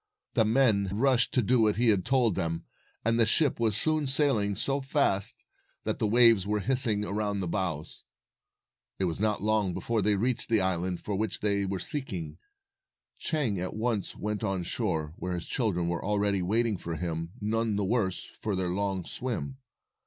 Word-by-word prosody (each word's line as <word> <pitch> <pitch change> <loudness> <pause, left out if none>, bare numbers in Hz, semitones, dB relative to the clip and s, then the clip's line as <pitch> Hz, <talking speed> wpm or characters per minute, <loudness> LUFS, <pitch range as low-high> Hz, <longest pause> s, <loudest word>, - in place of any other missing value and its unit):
The 115 -3 +3
men 110 -4 +3
rushed 120 +3 +2
to 125 - +3
do 115 0 +3
as 105 - -1
he 120 0 +3
had 100 -4 +2
told 125 -4 +2
them, 85 -2 -3 0.4
257 - - +3
and 115 - +1
the 115 - +6
ship 145 +4 +2
was 110 -3 +1
soon 155 -2 +1
sailing 130 -8 +2
so 135 +7 0
fast 135 -8 +3 0.4
that - - -2
the 110 - +1
waves 115 -3 +5
were 105 0 0
hissing 115 -3 +1
around 105 0 -2
the 95 - -2
bows. 85 -5 -3 0.9
It 95 - 0
was 85 0 -2
not 105 -2 0
long 105 -4 +1
before 115 -2 -1
they 105 0 +2
reached 120 +5 0
the 115 -2 +4
island 90 -1 -1
for 105 - -3
which 110 +2 -2
they 100 -1 +1
were 95 0 -2
seeking. 95 - -4 0.8
Chang 135 - -1
at 90 +1 -4
once 110 -2 -2
went 105 +1 -4
on 95 -4 -1
shore, 80 -2 -2
where 90 0 -4
his 85 - -5
children 95 -8 -1
were 85 -1 -2
already 100 -1 0
waiting 110 +3 +1
for 85 -1 -5
him, 85 0 -4
none 110 +1 -1
the 100 -1 0
worse 95 -3 0
for 105 -2 -5
their 90 -1 -1
long 95 -1 -2
swim. 130 +2 -5
105 Hz, 185 wpm, -28 LUFS, 95-115 Hz, 0.9 s, the